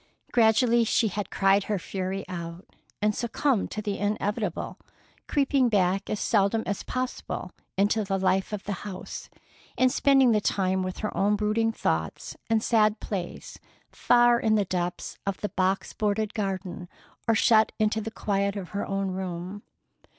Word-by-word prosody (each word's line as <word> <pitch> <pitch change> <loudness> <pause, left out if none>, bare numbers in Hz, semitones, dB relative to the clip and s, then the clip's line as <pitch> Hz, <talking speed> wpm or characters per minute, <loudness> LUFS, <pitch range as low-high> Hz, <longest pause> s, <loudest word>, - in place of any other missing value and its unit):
Gradually 235 +1 +4
she 225 0 +2
had 205 +1 -4
cried 195 +1 +3
her 210 - 0
fury 190 +1 -4
out, 170 0 -6 0.4
and 210 0 +3
succumbed 240 +1 0
to 215 - -5
the 205 -1 -2
inevitable, 205 -2 -2 0.5
creeping 275 -3 +2
back 195 -2 +1
as 210 - -1
seldom 215 +1 +2
as 200 - -2
possible 255 0 -4 0.3
into 205 +2 +2
the 195 -1 -1
life 190 +1 +1
of 210 -2 -4
the 205 - -3
house, 190 -3 -7 0.5
and 255 0 +4
spending 270 -2 +4
the 210 -2 +3
time 190 -2 +1
with 185 0 -3
her - - -3
own 205 +2 +2
brooding 215 +2 +1
thoughts 80 - -2
and 225 -1 +2
sad 215 -2 +3
plays, 185 -4 -5 0.3
far 240 0 +4
in 220 -1 +2
the 205 -2 +2
depths 180 -1 -3
of 195 - -1
the 210 - -2
box 190 +1 0
boarded 215 0 -1
garden, 190 -4 -4 0.4
or 225 - +4
shut 220 0 +4
into 220 0 +1
the 220 - -4
quiet 200 -2 -1
of 195 -4 -5
her 200 - -3
own 195 -1 -1
room. 185 +1 -5
205 Hz, 160 wpm, -27 LUFS, 190-220 Hz, 0.5 s, Gradually